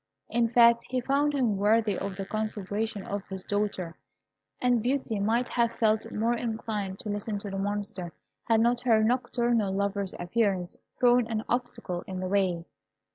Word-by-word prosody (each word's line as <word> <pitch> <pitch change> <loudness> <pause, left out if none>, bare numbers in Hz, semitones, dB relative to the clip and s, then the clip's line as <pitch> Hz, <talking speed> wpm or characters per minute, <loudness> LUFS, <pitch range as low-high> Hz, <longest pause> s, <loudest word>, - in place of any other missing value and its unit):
In 235 0 +2
fact, 235 0 +5
he 255 - 0
found 285 +3 +1
him 235 -7 +1
worthy 210 0 +3
of 195 +1 -4
the 195 0 -4
consideration 215 0 -3
of 205 0 -3
his 190 -1 -6
daughter, 200 -5 -2 0.6
and 245 -2 +2
Beauty 245 -3 -1
might 230 +5 +1
have 235 -1 +1
felt 220 -1 +1
more 230 +3 +1
inclined 220 -4 -3
to 215 - -6
listen 205 +1 -2
to 200 0 -6
the 195 - -3
Monster, 200 -3 -3 0.3
had 225 -1 +3
not 240 +1 +2
her 225 -3 +4
nocturnal 240 -3 +1
lover's 200 0 -1
appearance 185 -1 0 0.2
thrown 245 -1 +4
an 220 -1 -2
obstacle 240 -7 -2
in 190 -2 -4
the 185 - -2
way. 185 -3 +1
215 Hz, 165 wpm, -28 LUFS, 200-235 Hz, 0.6 s, fact